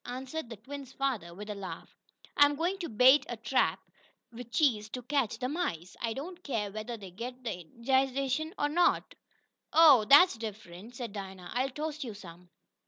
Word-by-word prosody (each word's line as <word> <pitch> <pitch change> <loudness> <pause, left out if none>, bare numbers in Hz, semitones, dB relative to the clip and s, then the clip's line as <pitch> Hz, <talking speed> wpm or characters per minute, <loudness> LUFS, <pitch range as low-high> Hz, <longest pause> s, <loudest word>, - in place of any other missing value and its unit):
answered 260 +3 -5
the 230 - -8
twins' 270 +4 -9
father, 250 -11 -2
with 205 +4 -9
a 210 - -3
laugh. 200 -2 -8 0.4
"I'm 290 0 +5
going 350 +6 -1
to 345 - -4
bait 255 +6 +6
a 240 - -4
trap 225 +4 +1 0.5
with 240 0 -9
cheese 235 -6 +2
to 250 +2 -6
catch 255 -4 0
the 250 - -2
mice. 220 - -3
I 230 -1 -1
don't 345 +8 -8
care 220 -7 -2
whether 215 +3 -5
they 195 -4 -10
get 250 +6 -7
the 215 -7 -4
indigestion 265 - 0
or 290 - +1
not." 345 +4 +2 0.6
"Oh! 300 -9 +7
Dat's 285 - +7
diffunt," 215 0 -8
said 235 -4 -6
Dinah. 190 -3 -8
"I'll 255 +3 0
toast 305 +2 -4
yo' 235 -4 -6
some." 180 -3 -13
245 Hz, 175 wpm, -30 LUFS, 210-280 Hz, 0.6 s, Oh